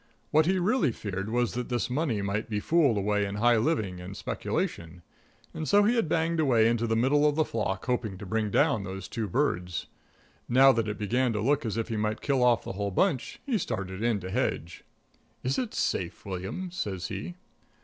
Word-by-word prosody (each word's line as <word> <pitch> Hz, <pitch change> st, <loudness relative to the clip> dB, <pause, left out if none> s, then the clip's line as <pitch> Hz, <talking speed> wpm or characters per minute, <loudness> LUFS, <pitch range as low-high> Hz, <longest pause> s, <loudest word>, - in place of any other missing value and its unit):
What 155 Hz, +1 st, +4 dB
he 190 Hz, +1 st, +3 dB
really 185 Hz, -, +2 dB
feared 95 Hz, -2 st, -5 dB
was 120 Hz, 0 st, 0 dB
that 125 Hz, 0 st, -4 dB
this 120 Hz, -2 st, 0 dB
money 125 Hz, -6 st, -1 dB
might 100 Hz, +3 st, -2 dB
be 105 Hz, -2 st, -1 dB
fooled 145 Hz, -3 st, +3 dB
away 105 Hz, +1 st, +1 dB
in 100 Hz, 0 st, -3 dB
high 120 Hz, +2 st, +4 dB
living 110 Hz, -, 0 dB
and 95 Hz, +2 st, -8 dB
speculation. 85 Hz, +1 st, -3 dB, 0.5 s
And 155 Hz, -3 st, -4 dB
so 205 Hz, 0 st, +6 dB
he 220 Hz, +4 st, +3 dB
had 225 Hz, -9 st, +1 dB
banged 165 Hz, 0 st, +1 dB
away 120 Hz, -7 st, +4 dB
into 115 Hz, 0 st, +1 dB
the 115 Hz, -, +1 dB
middle 145 Hz, +6 st, +3 dB
of 145 Hz, -, -2 dB
the 155 Hz, 0 st, +2 dB
flock, 100 Hz, -4 st, -2 dB
hoping 115 Hz, -6 st, -1 dB
to 100 Hz, -, -8 dB
bring 110 Hz, +2 st, -1 dB
down 100 Hz, +1 st, +2 dB
those 95 Hz, 0 st, -6 dB
two 110 Hz, -2 st, -3 dB
birds. 90 Hz, -, -1 dB, 0.6 s
Now 135 Hz, +2 st, +7 dB
that 115 Hz, -3 st, 0 dB
it 105 Hz, -, -3 dB
began 120 Hz, +4 st, +1 dB
to 105 Hz, -, -1 dB
look 130 Hz, +3 st, +1 dB
as 110 Hz, -, -3 dB
if 115 Hz, -, -2 dB
he 115 Hz, -, -2 dB
might 105 Hz, +1 st, -1 dB
kill 135 Hz, -3 st, +1 dB
off 120 Hz, -2 st, +4 dB
the -, -, -5 dB
whole 100 Hz, +1 st, -2 dB
bunch 135 Hz, -, 0 dB
he 250 Hz, -7 st, 0 dB
started 100 Hz, -, -4 dB
in 115 Hz, -3 st, +1 dB
to 90 Hz, +1 st, -6 dB
hedge. 90 Hz, -7 st, -2 dB, 0.6 s
"Is 130 Hz, +2 st, 0 dB
it 245 Hz, -4 st, -3 dB
safe, 90 Hz, 0 st, -2 dB
William?" 95 Hz, -, -5 dB
says 95 Hz, -, -4 dB
he. 175 Hz, -, -5 dB
115 Hz, 210 wpm, -28 LUFS, 100-140 Hz, 0.6 s, Now